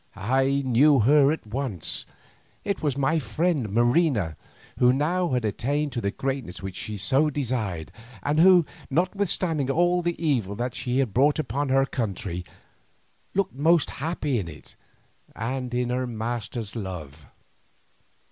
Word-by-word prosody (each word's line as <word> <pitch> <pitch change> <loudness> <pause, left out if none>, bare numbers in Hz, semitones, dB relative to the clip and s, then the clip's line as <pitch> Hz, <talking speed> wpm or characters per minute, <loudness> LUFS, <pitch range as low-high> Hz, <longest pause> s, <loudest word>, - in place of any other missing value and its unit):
I 135 +6 +1
knew 130 +2 +5
her 140 +4 +5
at 160 - -4
once; 110 - -3 0.6
it 200 -1 -2
was 145 -3 -1
my 150 +4 +2
friend 155 -5 0
Marina, 120 - +2 0.4
who 125 0 +6
now 170 +7 +1
had 125 -4 0
attained 145 +8 -1
to 120 - -3
the 100 - 0
greatness 130 -5 -4
which 95 -2 -6
she 105 +1 -4 0.3
desired, 115 - -3 0.3
and 150 +2 +1
who, 180 -1 +7 0.2
notwithstanding 170 -3 0
all 175 +4 +2
the 175 0 -2
evil 125 - 0
that 120 +3 -3
she 125 0 -2
had 130 -7 +1
brought 145 +4 +3
upon 145 -1 -2
her 135 +1 +4
country, 95 -8 -3 0.9
looked 195 -10 0
most 160 +4 +3
happy 150 -5 -1
in 90 - -4
it 75 -2 -10 0.6
and 125 +2 -3
in 125 0 -1
her 125 0 -1
master's 115 -1 -4
love. 80 - -7
130 Hz, 140 wpm, -25 LUFS, 110-150 Hz, 0.9 s, who